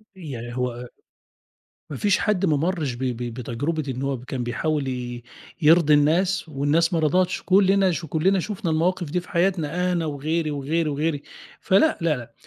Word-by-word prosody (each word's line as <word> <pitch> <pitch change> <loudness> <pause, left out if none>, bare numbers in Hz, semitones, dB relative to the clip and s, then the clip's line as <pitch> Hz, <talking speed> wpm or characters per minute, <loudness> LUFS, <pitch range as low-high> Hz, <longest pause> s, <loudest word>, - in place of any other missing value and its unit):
يعني 120 -9 -7
هو 125 -1 -3 1.0
ما 140 - -5
فيش 205 -2 +2
حد 205 -3 +1
ما 155 -5 +2
مرّش 160 -4 -1
ب 120 - -10
ب 125 -3 -1 0.2
بتجربة 130 +7 -3
إنه 130 +1 -3
هو 135 -2 -2
كان 125 0 -5
بيحاول 145 +3 -1
ي 120 -2 -5 0.4
يرضي 155 0 +5
الناس 170 +4 +2
والناس 155 +5 +1
ما 165 - +2
رضتش، 175 +4 +1
كلنا 195 0 +4
ش 165 0 -4
كلنا 175 +6 +1
شُفنا 180 -3 -3
المواقف 175 +1 0
دي 180 - +1
في 180 - -13
حياتنا 180 -1 0
أنا 170 -2 0
وغيري 155 +2 -2
وغيري 150 +3 -1
وغيري، 145 0 -1 0.4
فلأ 200 +12 +3
لأ 125 -8 -1
155 Hz, 165 wpm, -23 LUFS, 135-180 Hz, 1.0 s, يرضي